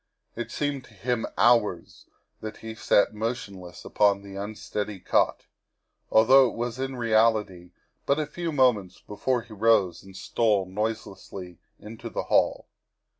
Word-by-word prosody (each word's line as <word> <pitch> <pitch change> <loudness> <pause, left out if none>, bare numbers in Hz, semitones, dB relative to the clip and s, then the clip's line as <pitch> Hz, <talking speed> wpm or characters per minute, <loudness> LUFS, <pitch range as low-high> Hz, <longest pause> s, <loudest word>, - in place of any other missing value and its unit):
It 120 0 -5
seemed 145 0 -2
to 110 - -19
him 115 +3 -2
hours 115 -8 +2 0.3
that 110 0 -7
he 110 0 -8
sat 105 -1 +2
motionless 105 -5 -5
upon 100 -1 +2
the 100 -1 -10
unsteady 105 0 -5
cot, 90 - +1 0.6
although 130 +4 +6
it - - -9
was 120 +1 -3
in 135 0 -3
reality 110 -6 +1 0.4
but 140 - +3
a 155 - 0
few 170 +2 -4
moments 120 - +2
before 120 +4 -2
he 115 - -13
rose 100 -5 +2
and 95 -1 -13
stole 105 -3 +1
noiselessly 95 -3 -5 0.2
into 110 +2 -9
the - - -3
hall. - - +1
110 Hz, 140 wpm, -26 LUFS, 100-120 Hz, 0.6 s, although